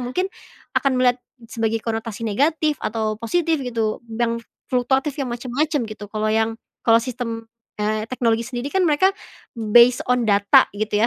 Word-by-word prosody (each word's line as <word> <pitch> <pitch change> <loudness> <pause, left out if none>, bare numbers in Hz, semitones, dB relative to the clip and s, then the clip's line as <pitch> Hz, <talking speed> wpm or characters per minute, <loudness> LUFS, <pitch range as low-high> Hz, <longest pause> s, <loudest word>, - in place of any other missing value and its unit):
mungkin 360 +11 -2 0.4
akan 275 -3 +2
melihat 250 0 +3 0.3
sebagai 225 -1 -1
konotasi 225 0 -3
negatif 295 +7 +1
atau 215 0 -2
positif 320 +5 0
gitu 230 -4 -2
dang 230 +1 -1 0.3
fluktuatif 265 +3 +1
yang 265 - -2
macem-macem 255 +4 -1
gitu 215 -1 -8
kalau 215 0 -1
yang, 225 0 +1 0.3
kalau 230 0 +7
sistem, 235 -2 -4 0.3
eee, 215 +1 -1
teknologi 230 -2 0
sendiri 250 +2 -4
kan 380 - +2
mereka, 320 +6 +4 0.6
based 240 +1 +7
on 250 -1 +3
data 200 0 +5
gitu 210 +1 -1
235 Hz, 145 wpm, -22 LUFS, 220-265 Hz, 0.6 s, kalau